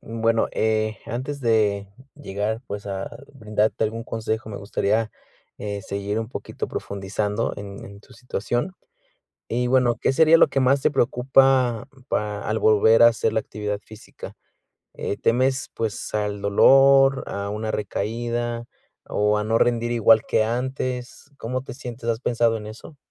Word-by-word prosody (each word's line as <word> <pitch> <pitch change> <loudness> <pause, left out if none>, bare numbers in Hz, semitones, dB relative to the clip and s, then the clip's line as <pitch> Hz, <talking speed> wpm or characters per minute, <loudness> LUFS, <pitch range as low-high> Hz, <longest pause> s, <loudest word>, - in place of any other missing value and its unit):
Bueno, 115 0 0
eh, 110 0 0
antes 130 +5 -4
de 105 -4 +1 0.3
llegar, 110 -4 -3
pues, 100 0 -6
a 95 -1 -4 0.3
brindarte 110 -3 0
algún 115 +1 -3
consejo, 110 -1 -3
me 100 - -6
gustaría, 105 +2 -1 0.5
eh, 100 -1 -5
seguir 100 +2 -3
un 115 - -4
poquito - - -5
profundizando 105 +2 -3
en 100 -1 -8
en 100 0 -12
tu - - -20
situación. 120 - -3 0.8
Y 120 +1 0
bueno, 125 -2 +3
¿qué - - +2
sería 160 +3 +6
lo - - +5
que 135 - -1
más 135 +2 +3
te - - +3
preocupa 130 -1 +3 0.2
pa 105 -1 -2
al 110 - 0
volver 110 +2 +5
a - - +10
hacer 115 -1 0
la 110 - +1
actividad 105 -1 -4
física? 110 0 -12 0.6
¿Eh, 100 - -3
temes, 130 +3 +1
pues, 110 -2 -4
al 105 -1 -1
dolor, 135 +6 +5
a 100 0 -4
una 110 +1 -3
recaída, 115 +3 -3 0.4
o, 105 0 +1
a 105 - -2
no 110 +1 +1
rendir 120 0 +1
igual 115 -1 +5
que - - +2
antes? 125 +3 -3
¿Cómo 125 +2 -4
te 125 - -9
sientes? 120 -3 -7
¿Has 115 -1 +1
pensado 115 -3 +1
en 105 - -8
eso? 110 +7 -11
115 Hz, 155 wpm, -23 LUFS, 105-125 Hz, 0.8 s, a